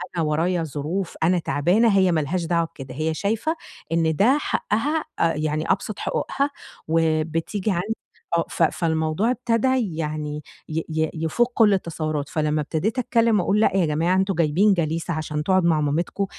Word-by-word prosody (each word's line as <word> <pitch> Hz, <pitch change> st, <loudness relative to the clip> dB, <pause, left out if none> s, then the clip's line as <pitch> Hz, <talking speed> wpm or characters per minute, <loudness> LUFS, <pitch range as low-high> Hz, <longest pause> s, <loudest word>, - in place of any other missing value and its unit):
أنا 170 Hz, -, +1 dB
ورايا 165 Hz, +3 st, 0 dB
ظروف، 160 Hz, +5 st, -3 dB
أنا 175 Hz, +2 st, +3 dB
تعبانة، 195 Hz, +8 st, +2 dB
هي 185 Hz, -2 st, +4 dB
ما 165 Hz, -, +2 dB
لهاش 170 Hz, +4 st, -2 dB
دعوة 170 Hz, 0 st, +1 dB
بكده، 135 Hz, -6 st, -10 dB
هي 155 Hz, +2 st, -1 dB
شايفة 220 Hz, -, -1 dB, 0.4 s
إن 165 Hz, -1 st, +2 dB
ده 240 Hz, -, +4 dB
حقّها 295 Hz, +4 st, -1 dB, 0.2 s
آآ، 165 Hz, 0 st, +3 dB
يعني 155 Hz, +1 st, -1 dB
أبسَط 200 Hz, +1 st, -2 dB
حقوقها، 280 Hz, +1 st, -1 dB, 0.4 s
وبتيجي 165 Hz, +5 st, 0 dB
عندي، 195 Hz, +5 st, -1 dB, 0.4 s
آه 165 Hz, -, +1 dB
ف -, -, 0 dB
فالموضوع 160 Hz, +6 st, +1 dB
ابتدى 235 Hz, -5 st, 0 dB
يعني 150 Hz, -1 st, -3 dB, 0.3 s
ي 160 Hz, +1 st, -1 dB
ي 160 Hz, 0 st, 0 dB
يفُوق 165 Hz, +10 st, 0 dB
كلّ 215 Hz, -4 st, +5 dB
التصوُّرات، 155 Hz, -5 st, -2 dB
فلمّا 155 Hz, -1 st, 0 dB
ابتديت 165 Hz, -, -1 dB
أتكلّم 230 Hz, -3 st, +2 dB
وأقول 195 Hz, +4 st, +1 dB
لأ 205 Hz, -3 st, +3 dB
يا 185 Hz, -, +3 dB
جماعة 160 Hz, +4 st, +1 dB
أنتم 190 Hz, +1 st, +1 dB
جايبين 170 Hz, +6 st, +3 dB
جليسة 165 Hz, 0 st, -1 dB
عشان 155 Hz, -1 st, -3 dB
تقعُد 185 Hz, +2 st, +3 dB
مع 160 Hz, -3 st, +3 dB
مامتكم، 160 Hz, +7 st, -1 dB
165 Hz, 165 wpm, -23 LUFS, 155-200 Hz, 0.4 s, كلّ